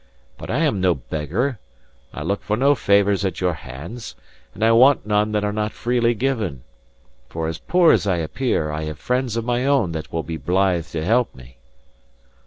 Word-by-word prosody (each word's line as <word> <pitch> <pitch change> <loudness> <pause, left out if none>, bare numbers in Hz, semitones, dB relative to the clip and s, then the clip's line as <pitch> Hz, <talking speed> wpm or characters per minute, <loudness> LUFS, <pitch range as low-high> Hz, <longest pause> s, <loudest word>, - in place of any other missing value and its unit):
But - - -10
I 135 +8 0
am 105 -11 0
no 90 -2 +3
beggar; 90 - -3 0.5
I - - -6
look 100 - -1
for 105 +1 -1
no 140 +4 +4
favours 100 -5 +2
at 95 - -2
your 90 -1 +1
hands, 80 - -9 0.4
and 110 - -3
I 115 - +5
want 125 +2 +5
none 105 0 +1
that 105 -1 0
are 105 0 -1
not 105 0 -2
freely 120 -1 +1
given. 110 - -2 0.7
For 80 -1 -3
as 80 -1 -4
poor 175 0 +4
as - - +2
I 95 - +2
appear, 80 - -1
I 75 +1 -3
have 75 -1 -5
friends 125 - -1
of 115 - -2
my 120 0 0
own 135 -10 +2
that 80 -1 -6
will 80 -1 -2
be 80 +2 -5
blithe 90 +3 +1
to 80 -1 -4
help 120 +5 +1
me." 60 -1 -15
105 Hz, 195 wpm, -21 LUFS, 80-120 Hz, 0.7 s, I